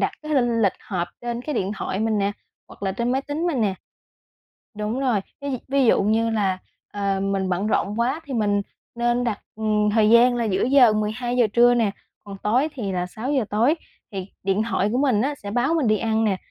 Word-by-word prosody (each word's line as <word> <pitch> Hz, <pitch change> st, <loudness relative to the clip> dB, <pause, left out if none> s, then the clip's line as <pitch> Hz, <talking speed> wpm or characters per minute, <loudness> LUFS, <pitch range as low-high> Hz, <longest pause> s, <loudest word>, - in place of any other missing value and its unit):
đặt -, -, +1 dB
cái 305 Hz, 0 st, -2 dB
linh 240 Hz, -3 st, +2 dB
lịch 195 Hz, -, +3 dB
họp 175 Hz, -3 st, -3 dB
trên 240 Hz, 0 st, -3 dB
cái 300 Hz, 0 st, -4 dB
điện 200 Hz, -2 st, -1 dB
thoại 190 Hz, 0 st, -3 dB
mình 220 Hz, -1 st, +1 dB
nè, 200 Hz, +1 st, 0 dB, 0.4 s
hoặc -, -, -15 dB
là 190 Hz, -1 st, 0 dB
trên 240 Hz, +4 st, -1 dB
máy 265 Hz, +1 st, 0 dB
tính 305 Hz, +5 st, -3 dB
mình 280 Hz, -9 st, 0 dB
nè 200 Hz, -3 st, +1 dB, 1.0 s
đúng 215 Hz, +5 st, -2 dB
rồi, 245 Hz, -7 st, +1 dB, 0.2 s
ví 280 Hz, -3 st, -3 dB
ví 275 Hz, -1 st, +2 dB
dụ -, -, +4 dB
như 225 Hz, +3 st, +2 dB
là, 195 Hz, -4 st, 0 dB, 0.3 s
ờ, 200 Hz, -1 st, -1 dB
mình 195 Hz, -1 st, -1 dB
bận 185 Hz, +3 st, -1 dB
rộn 210 Hz, +1 st, 0 dB
quá 260 Hz, +7 st, 0 dB
thì 275 Hz, -3 st, -6 dB
mình 205 Hz, -2 st, +1 dB, 0.3 s
nên 240 Hz, +1 st, +1 dB
đặt, 215 Hz, -4 st, -2 dB, 0.2 s
ừm, 210 Hz, -1 st, +1 dB
thời 215 Hz, 0 st, +3 dB
gian 240 Hz, +1 st, +6 dB
là 235 Hz, -, 0 dB
giữa 195 Hz, -3 st, +1 dB
giờ, 255 Hz, -3 st, +6 dB
12:00 240 Hz, +3 st, 0 dB
trưa 240 Hz, +1 st, +5 dB
nè, 225 Hz, -4 st, +2 dB, 0.3 s
còn 200 Hz, -1 st, -9 dB
tối 245 Hz, +10 st, +1 dB
thì 205 Hz, -7 st, -3 dB
là 180 Hz, 0 st, -1 dB
6:00 255 Hz, +6 st, -2 dB
tối 235 Hz, +9 st, +3 dB, 0.4 s
thì 190 Hz, -2 st, -4 dB, 0.2 s
điện 195 Hz, +2 st, +1 dB
thoại 200 Hz, -, +1 dB
của 250 Hz, -, +1 dB
mình 260 Hz, -7 st, +2 dB
nó 285 Hz, +4 st, 0 dB
sẽ 205 Hz, -7 st, -8 dB
báo 245 Hz, +9 st, +1 dB
mình 300 Hz, -7 st, +1 dB
đi 215 Hz, 0 st, +3 dB
ăn 225 Hz, -1 st, 0 dB
nè. 195 Hz, -3 st, +1 dB
225 Hz, 220 wpm, -23 LUFS, 205-245 Hz, 1.0 s, gian